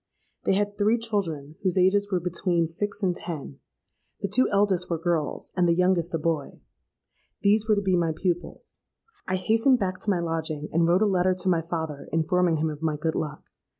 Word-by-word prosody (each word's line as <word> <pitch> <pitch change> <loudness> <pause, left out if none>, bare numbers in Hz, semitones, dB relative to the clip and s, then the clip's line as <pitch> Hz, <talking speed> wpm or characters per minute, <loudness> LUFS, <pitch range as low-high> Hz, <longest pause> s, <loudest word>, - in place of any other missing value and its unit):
They 195 - +3
had 205 +1 -1
three 215 +3 +3
children, 165 -10 -3
whose 185 -2 0
ages 200 +2 +3
were 185 - +2
between 175 0 0
six 200 +5 -4
and 180 -2 +2
ten: 150 -6 -7 0.6
the - - -2
two 230 +7 +2
eldest 195 -3 +1
were 170 - 0
girls, 165 -2 -2
and 180 -2 +3
the 170 - +4
youngest 180 -2 +2
a - - +2
boy. 155 -2 -2 0.8
These 210 +2 +3
were 215 - +5
to 200 - -1
be 190 -1 +2
my 170 -2 +1
pupils. 175 +2 -4 0.5
I 185 - 0
hastened 225 +7 +3
back 185 -4 -2
to - - -4
my 185 -3 +2
lodging, 160 -3 -3
and 165 +1 +3
wrote 180 +4 +4
a - - +4
letter 185 -2 +2
to 185 +1 -1
my 170 -2 +2
father 160 -3 -5
informing 165 +2 +2
him 155 +1 0
of 150 0 -9
my 155 -2 0
good 160 +1 -1
luck. 150 -1 -4
180 Hz, 200 wpm, -26 LUFS, 165-200 Hz, 0.8 s, were